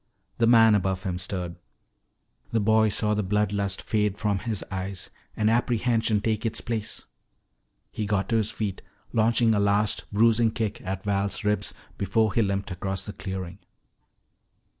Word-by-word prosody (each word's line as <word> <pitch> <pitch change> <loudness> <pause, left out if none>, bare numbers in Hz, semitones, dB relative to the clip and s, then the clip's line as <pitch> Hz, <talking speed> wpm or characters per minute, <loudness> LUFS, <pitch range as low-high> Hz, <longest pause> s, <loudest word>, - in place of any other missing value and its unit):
The 115 - +4
man 115 -2 +7
above 95 -2 0
him 90 -2 -2
stirred. 90 -2 -3 0.9
The 115 - +2
boy 110 +1 +4
saw 105 +1 0
the 105 - +1
blood 105 +1 0
lust 100 -2 -1
fade 105 -2 0
from 105 -2 0
his 110 +1 -3
eyes 95 -1 -5 0.3
and 105 - +2
apprehension 115 -2 +2
take 110 -1 -1
its 115 -2 0
place. 115 -2 -4 0.9
He 105 - -3
got 100 -2 0
to 115 - +2
his 110 -1 +1
feet, 105 -4 -4 0.3
launching 115 0 +3
a 105 - +2
last 100 +1 +1
bruising 115 +2 +4
kick 110 -3 -3
at 95 +1 -4
Val's 100 -1 0
ribs 105 0 0 0.2
before 105 +2 +1
he 115 - +3
limped 100 -1 -1
across 95 +1 -3
the 105 - -6
clearing. 95 -1 -6
105 Hz, 160 wpm, -26 LUFS, 95-110 Hz, 0.9 s, man